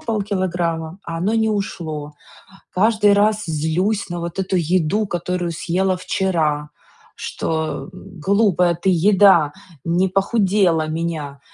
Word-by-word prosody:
полкилограмма? 180 -6 -2
А 165 0 -5
оно 195 +6 0
не 220 -1 +2
ушло. 160 -8 -4 0.6
Каждый 210 +1 +3
раз 210 +1 +2
злюсь 175 +7 -1
на 175 0 -4
вот 170 +2 -5
эту 190 0 -1
еду, 180 +4 +1
которую 175 -1 -2
съела 185 +3 0
вчера, 170 -6 -1 0.5
что, 160 +3 -3
м: 185 -1 -12
"Глупая 190 -1 +2
ты 175 +3 0
еда, 180 -4 +5 0.3
не 175 +3 +1
похудела 195 -4 +2
меня". 155 -3 -4
180 Hz, 120 wpm, -20 LUFS, 165-200 Hz, 0.6 s, еда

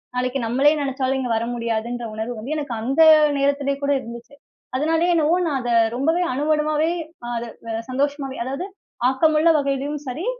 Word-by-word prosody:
நாளைக்கு 250 +2 -1
நம்மளே 275 +6 +4
நெனைச்சாலும் 270 -1 -1
இங்க 250 -2 -2
வர 230 - -2
முடியாதுன்ற 235 +1 -3
உணர்வு 225 +2 -4
வந்து, 265 +8 -4
எனக்கு 285 -5 -4
அந்த 270 +7 +1 0.4
நேரத்திலே 280 0 +1
கூட 285 - +2
இருந்துச்சு. 235 +4 -10 0.4
அதனாலே 325 +4 +1
என்னவோ 325 0 +3
நான் 280 -4 0
அத 245 -1 -4 0.2
ரொம்பவே 320 +8 +1
அணு 265 +3 -2
அணுவாவே 305 +1 +1 0.4
அதை 235 0 -3 0.4
சந்தோஷமாவே, 275 +1 -2
அதாவது 275 +8 -4 0.4
ஆக்கமுள்ள 310 +4 +3
வகையிலயும் 280 +1 -2
சரி, 290 +9 -4
275 Hz, 150 wpm, -22 LUFS, 245-300 Hz, 0.4 s, நம்மளே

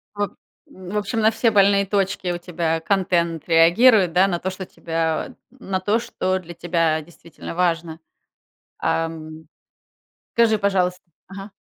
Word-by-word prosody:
Воб 205 0 -2 0.3
в 185 +2 -7
общем, 210 +2 -2
на 220 0 +4
все 225 +1 +1
больные 200 -1 +4
точки 195 -2 -1
у 175 - -2
тебя 170 -2 -2
контент 170 -3 0
реагирует, 175 +4 +5
да? 185 +2 +4
На 175 -3 -2
то, 190 - -3
что 190 0 -7
тебя, 165 - -3 0.2
на 195 -7 -4
то, 210 +4 +1
что 185 -4 -2
для 175 -1 -11
тебя 165 -2 0
действительно 170 +1 -11
важно. 170 -2 -1 0.8
Ам. 160 -1 -3 0.9
Скажи, 225 -2 +3
пожалуйс 190 -3 +1 0.3
ага. 195 +2 -9
180 Hz, 140 wpm, -22 LUFS, 165-200 Hz, 0.9 s, реагирует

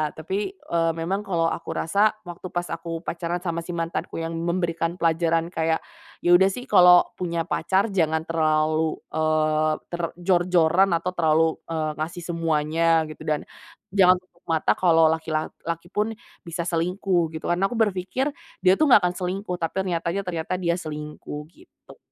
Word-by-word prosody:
tapi, 160 +5 -5 0.2
eee, 165 - -1
memang 185 +5 -2
kalau 170 -3 +1
aku - - -6
rasa 200 +6 +2
waktu 175 +1 -8
pas 175 0 -2
aku 165 0 -5
pacaran 170 +1 -3
sama 170 -2 -2
si 175 - -5
mantanku 165 0 -3
yang 165 0 -4
memberikan 170 0 -1
pelajaran 165 0 +1
kayak, 160 0 +1 0.4
"Ya 175 - +1
udah 190 +1 +4
sih 250 +1 -7
kalau 180 -3 +7
punya 170 -2 -1
pacar 190 +6 +1
jangan 160 -4 +1
terlalu, 155 0 +1 0.2
eee, 155 0 +1 0.2
ter 175 0 -3 0.2
jor-joran 175 0 +3
atau 180 +2 -3
terlalu, 160 -1 +4 0.2
eee, 155 -2 -1
ngasih 165 +3 -4
semuanya 165 0 +2
gitu 155 - -11
dan 150 -1 +1 0.5
jangan 185 -2 +6
tutup 175 -2 -33
mata 160 -1 +2
kalau 165 -3 +5
laki 160 0 -3
lak 155 - -1 0.2
laki 170 +1 -3
pun 215 +2 -1 0.3
bisa 170 +1 -3
selingkuh," 175 0 0
gitu. 160 - -6
Karena 180 +3 +2
aku 240 - -6
berpikir 210 +7 0 0.3
dia 185 0 +6
tuh 310 - +5
nggak 245 - +8
akan 180 0 0
selingkuh 185 +1 -3
tapi 165 -1 -2
ternyatanya 175 +1 -1
ternyata 170 0 -3
dia 170 0 +2
selingkuh, 150 -2 -7
gitu. 355 - -19
170 Hz, 165 wpm, -24 LUFS, 160-180 Hz, 0.5 s, nggak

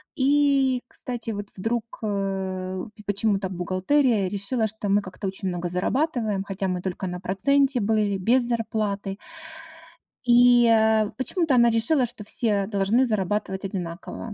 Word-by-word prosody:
И, 275 -2 +2
кстати, 240 -3 -3
вот 205 -1 -5
вдруг, 225 +4 -1 0.2
э, 190 -2 -3 0.2
пи 210 - -14
почему-то 200 -1 0
бухгалтерия 190 +5 +1
решила, 210 +4 0
что 215 -1 -5
мы 205 +1 +3
как-то 190 +1 -7
очень 190 +1 -4
много 175 0 -3
зарабатываем, 220 - -1
хотя 195 -1 -4
мы 180 -1 -2
только 190 0 -4
на 180 0 -5
проценте 265 +9 +2
были, 205 -1 +1
без 240 +7 +2
зарплаты. 215 -4 -2 1.1
И, 245 0 +6
э, 220 -1 +3
почему-то 310 +1 +1
она 235 -1 +5
решила, 235 +5 +2
что 235 -2 -5
все 210 -1 +3
должны 210 +5 +1
зарабатывать 200 -3 -2
одинаково. 185 +3 -6
210 Hz, 140 wpm, -24 LUFS, 195-240 Hz, 1.1 s, И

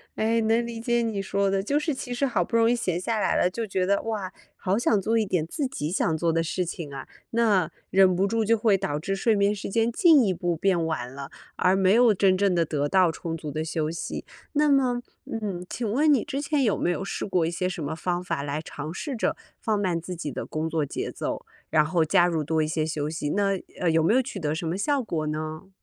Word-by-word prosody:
哎， 225 +1 +1
能 225 +2 +2
理 230 -1 -6
解 240 0 +1
你 220 -4 -1
说 195 0 0
的， 195 - +1
就 280 +9 0
是 305 -1 -1
其 250 -1 -5
实 260 +3 0
好 230 -9 +1
不 230 - -4
容 230 0 +4
易 - - +3
闲 180 -7 -1
下 220 +3 -1
来 - - +1
了， 180 - +3
就 225 +4 -4
觉 185 -1 0
得， 200 +1 +2
哇， 210 -5 -3 0.2
好 195 +2 0
想 220 -3 +2
做 225 +3 +1
一 220 - +2
点 180 -5 0
自 270 - -2
己 155 - -4
想 160 -4 +1
做 165 0 +1
的 165 - +2
事 180 +2 -1
情 160 -3 -6
啊。 135 - -7 0.2
那， 210 -8 +2 0.2
忍 190 -1 +5
不 190 - +2
住 225 +2 0
就 225 +2 +3
会 210 -3 +3
导 185 -7 -2
致 195 +6 -2
睡 220 +2 +2
眠 200 +1 +3
时 200 - -5
间 225 +3 +1
进 310 -2 +6
一 195 - +1
步 175 -1 -1
变 175 0 +1
晚 125 -6 -3
了， 140 0 -7 0.3
而 180 +1 +3
没 190 0 +4
有 235 -2 +6
真 190 -1 +3
正 200 -1 +2
地 165 -1 +2
得 145 -1 -1
到 185 -1 +4
充 165 0 -5
足 150 -2 -6
的 155 +2 -2
休 160 -1 -2
息。 170 - -5 0.3
那 300 0 +3
么， 255 -3 +2 0.2
嗯， 200 -5 -4
请 235 -3 -3
问 295 +8 +3
你 270 -7 +3
之 280 0 -3
前 290 -2 +1
有 215 - +2
没 - - 0
有 175 - -1
试 - - -3
过 180 -4 +1
一 165 - -1
些 180 +1 -1
什 165 -3 -5
么 155 +3 -3
方 175 +1 -2
法 140 - -2
来 145 +1 -3
尝 155 -1 -7
试 280 +5 -4
着 225 - 0 0.2
放 215 -2 0
慢 180 -4 0
自 180 +1 -6
己 155 -4 -5
的 - - -5
工 155 +1 -2
作 160 -2 0
节 - - -4
奏， - - -4 0.2
然 155 -1 +4
后 165 +1 +2
加 175 +3 +4
入 165 -3 0
多 160 +1 +1
一 - - -1
些 155 0 -1
休 150 -2 -2
息， 155 -2 -3
那 195 -2 +1 0.2
呃， 175 - +2
有 160 0 +3
没 170 +8 +3
有 260 - +5
取 245 -6 -6
得 155 -2 -1
什 165 0 -3
么 165 - -1
效 280 +4 +1
果 155 -8 -2
呢？ 155 +3 -4
190 Hz, 280 characters per minute, -26 LUFS, 165-225 Hz, 0.3 s, 进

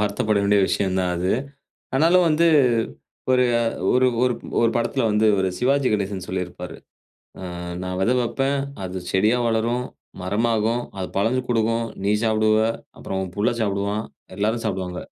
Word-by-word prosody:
வருத்தப்பட 105 0 +1
வேண்டிய 100 0 +4
விஷயந்தான் 95 -2 0
அது. 90 +2 0 0.6
ஆனாலு 165 +6 +5
வந்து, 165 +2 +3 0.8
ஒரு 125 0 +4 0.5
ஒரு 130 0 +4 0.2
ஒரு-ஒரு 120 -2 0
படத்தில 120 +1 0
வந்து, 105 +1 +2
இவரு 95 -1 +1
சிவாஜி 135 +1 +2
கணேசன் 100 -2 -2
சொல்லியிருப்பாரு. 90 -1 -5 0.7
அ, - - -8 0.4
நா 90 - -4
வெத 115 +6 +2
வப்பேன். 135 +3 0 0.3
அது 95 0 -4
செடியா 105 +6 +3
வளரும். 115 +2 0 0.4
மரமாகும். 115 +4 0 0.2
அது 95 - -3
பழங்க 115 +6 +1
கொடுக்கும். 115 0 +1 0.2
நீ 100 - +2
சாப்பிடுவ. 110 -1 +3 0.4
அப்புறம் 95 - -4
உன் 90 -1 -7
புள்ள 105 - +2
சாப்பிடுவான். 100 +1 -1 0.3
எல்லாரும் 110 +3 0
சாப்பிடுவாங்க. 95 -4 -3
110 Hz, 135 wpm, -23 LUFS, 95-120 Hz, 0.8 s, ஆனாலு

